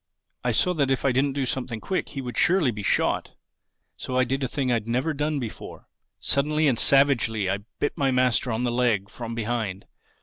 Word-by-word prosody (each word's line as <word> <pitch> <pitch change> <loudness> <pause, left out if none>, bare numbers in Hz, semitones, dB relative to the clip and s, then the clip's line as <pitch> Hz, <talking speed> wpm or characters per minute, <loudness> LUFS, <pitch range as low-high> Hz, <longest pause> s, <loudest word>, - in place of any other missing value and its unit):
I 125 - +1
saw 180 +11 +2
that 140 -5 +1
if 135 0 0
I 135 - +4
didn't 135 +2 +1
do 140 -1 -1
something 125 -2 -3
quick 190 - -2
he 135 - -5
would 125 -2 -6
surely 175 -8 +3
be 105 -2 -6
shot. 100 - 0 0.6
So 130 - -3
I 130 - +4
did 135 +2 -2
a - - +1
thing 130 0 -1
I've 115 -2 0
never 130 +7 0
done 150 +1 -1
before: 120 -5 -7 0.3
suddenly 150 +2 +1
and 125 -5 +2
savagely 125 -7 +3
I 95 +1 0 0.2
bit 145 - -1
my 135 -1 +1
master 125 -1 +2
in 110 +2 -1
the 120 - 0
leg 115 -5 +1
from 115 -1 -6
behind. 110 -4 -3
125 Hz, 205 wpm, -25 LUFS, 115-140 Hz, 0.6 s, I